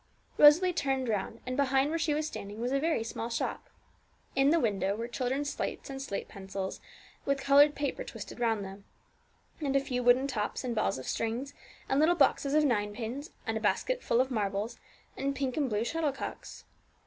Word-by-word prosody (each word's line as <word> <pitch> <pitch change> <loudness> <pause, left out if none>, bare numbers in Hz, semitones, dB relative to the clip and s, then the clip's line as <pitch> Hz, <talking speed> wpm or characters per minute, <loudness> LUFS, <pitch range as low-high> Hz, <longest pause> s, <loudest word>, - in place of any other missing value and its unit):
Rosalie 340 +5 +7
turned 270 -4 0
round, 215 +2 -2
and 255 0 -3
behind 275 +1 +2
where 330 - 0
she 310 -2 +1
was 305 +1 0
standing 205 -8 -6
was 245 +2 -1
a 275 - +2
very 315 -6 +1
small 230 0 -4
shop. 230 - -3 0.7
In 270 +1 +4
the 330 +2 +4
window 200 - 0
were 230 +2 -4
children's 265 +4 -1
slates - - -4
and 270 0 -5
slate 200 -8 -4
pencils, 195 0 -6 0.4
with 275 0 +1
coloured 285 +2 +6
paper 290 - -2
twisted - - -8
round 225 -4 +1
them, 195 +1 -10 0.7
and 280 -3 -1
a - - +6
few 250 -2 -2
wooden 245 +2 +5
tops, 225 -5 -2
and 250 -2 -2
balls 215 -10 0
of 130 - -7
string, 230 +4 -1 0.4
and 270 - +2
little 325 +3 +5
boxes 280 -4 +3
of 305 0 +5
ninepins, 230 - -2 0.2
and - - -1
a - - -4
basket - - 0
full 235 - +1
of 260 +1 +2
marbles, 205 -1 -2 0.4
and 275 +1 -2
pink 265 -3 -2
and 285 -4 0
blue 210 0 0
shuttlecocks. 300 -2 -4
260 Hz, 190 wpm, -30 LUFS, 225-285 Hz, 0.7 s, Rosalie